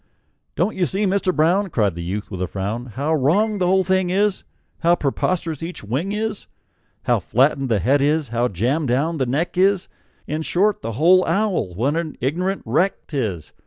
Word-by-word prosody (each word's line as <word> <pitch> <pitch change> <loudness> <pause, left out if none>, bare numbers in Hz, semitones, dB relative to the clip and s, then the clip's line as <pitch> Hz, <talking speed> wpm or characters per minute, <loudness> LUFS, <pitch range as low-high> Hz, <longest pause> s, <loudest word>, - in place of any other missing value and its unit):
"Don't 215 - 0
you 180 -2 +1
see, 200 +2 0
Mister 195 -1 +1
Brown," 180 +5 +2
Cried 105 - +1
the 85 - -6
youth, 100 +5 -4
with 95 -2 -5
a 90 - 0
frown, 105 +6 -4
"How 140 +7 -2
wrong 195 +9 +2
the 180 - +1
whole 190 +1 +3
thing 185 0 +1
is, 200 +2 +1 0.4
How 170 +1 +4
preposterous 165 +1 -1
each 170 -4 -6
wing 135 - -2
is, 215 0 -3 0.6
How - - +2
flattened 135 +1 +1
the 110 - +2
head 135 +10 +2
is, 150 -1 +1
how 120 +1 +1
jammed 125 - -1
down 145 +6 0
the 130 - 0
neck 160 +8 -1
is 195 0 +3 0.4
In 155 +2 -3
short, 195 +6 +1
the 115 +1 -4
whole 180 - +5
owl, 180 - 0
what 135 - 0
an 165 -2 -4
ignorant 180 +9 -1
wreck 160 - 0
't 150 - -7
is! 95 - -3
155 Hz, 195 wpm, -21 LUFS, 120-185 Hz, 0.6 s, whole